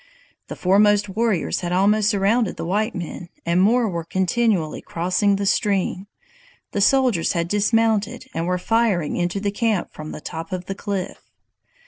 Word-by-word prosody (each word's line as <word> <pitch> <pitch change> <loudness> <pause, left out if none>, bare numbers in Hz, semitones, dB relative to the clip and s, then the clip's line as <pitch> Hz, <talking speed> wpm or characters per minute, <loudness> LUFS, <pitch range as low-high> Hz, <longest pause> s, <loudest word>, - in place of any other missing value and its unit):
"The - - -6
foremost 205 +2 +3
warriors 215 -2 0
had 175 -1 -4
almost 205 +3 +3
surrounded 210 +2 +1
the - - -4
white 210 +6 -1
men, 175 0 -6 0.2
and 170 +2 +2
more 230 +4 +3
were 170 -4 -3
continually 185 -1 0
crossing 185 +4 0
the 200 0 -2
stream. 195 -1 0 0.6
The 200 - -1
soldiers 245 -6 +3
had 170 -1 -1
dismounted, 215 +2 +1
and 165 +1 -2
were 180 0 +1
firing 200 -5 +1
into 175 +3 -1
the 200 0 -1
camp 215 -3 -1
from 155 0 -8
the - - -7
top 160 +3 -7
of 185 -1 -4
the 195 - -4
cliff." 195 -1 -4
195 Hz, 160 wpm, -22 LUFS, 175-215 Hz, 0.6 s, foremost